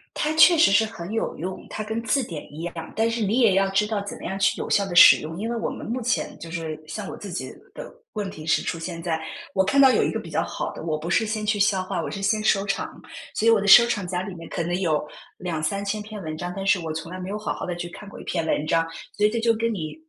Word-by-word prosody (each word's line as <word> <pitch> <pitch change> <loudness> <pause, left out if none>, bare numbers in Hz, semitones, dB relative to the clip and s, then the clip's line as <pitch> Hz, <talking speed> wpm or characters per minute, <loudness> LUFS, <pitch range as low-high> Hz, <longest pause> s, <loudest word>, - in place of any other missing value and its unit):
它 305 - 0
确 335 +2 +7
实 325 - +6
是 205 +2 +5
很 195 -3 -7
有 225 - -2
用， 185 +3 -5
它 215 - -4
跟 220 +2 -3
字 270 +4 +1
典 160 -7 -8
一 160 +3 -7
样， 170 -1 -6
但 225 +1 +2
是 230 0 -2
你 210 +4 +1
也 220 -5 +5
要 195 0 +3
知 195 +2 +2
道 210 -1 -1
怎 200 - -7
么 - - -11
样 190 +2 -3
去 195 - +2
有 - - -3
效 200 - +3
地 180 - -5
使 - - +10
用。 160 +2 -7
因 225 - -2
为 235 - -2
我 225 - -2
们 - - -7
目 245 +3 -2
前 245 - -1
就 165 - -9
是 160 -2 -5
像 195 +5 -5
我 - - -7
自 200 - -8
己， 175 - -4 0.2
的， - - -8 0.2
问 205 -3 -3
题 155 - -10
是 165 - +2
出 165 - -3
现 165 0 -5
在， 160 -2 -1 0.3
我 190 - +3
看 275 +8 +3
到 265 -1 +8
有 - - +3
一 - - +1
个 - - -3
比 - - -8
较 - - 0
好 - - -4
的， - - -9
我 155 -2 -2
不 160 +3 -6
是 220 - +3
先 215 0 -3
去 210 -1 +1
消 195 -2 +3
化， - - -3
我 - - -4
是 200 - -5
先 215 +2 +1
收藏， 195 -1 0 0.3
所 225 - 0
以 - - +8
我 225 -2 +5
的 200 - -2
收藏 235 -2 +7
夹 180 0 -2
里 190 -1 -6
面 165 -1 -10
可 - - -3
能 175 +2 -1
有 155 -4 0 0.3
2000-3000 195 +5 -2
篇 210 0 -8
文 155 -2 -5
章， 175 +2 -4
但 195 - -4
是 190 -2 +4
我 160 -1 -4
从 165 +2 -6
来 185 - -6
没 185 +2 -5
有 210 - -3
好 215 - -2
好 - - -6
地 175 -1 -3
去 175 0 -5
看 205 +3 -11
过 - - -11
一 - - -9
篇 - - -2
文 150 - 0
章。 165 +1 +2 0.3
所 210 - -1
以 210 - +5
这 230 - -2
就 230 0 +3
跟 230 +1 -1
你 160 -7 -4
195 Hz, 325 characters per minute, -24 LUFS, 170-215 Hz, 0.3 s, 使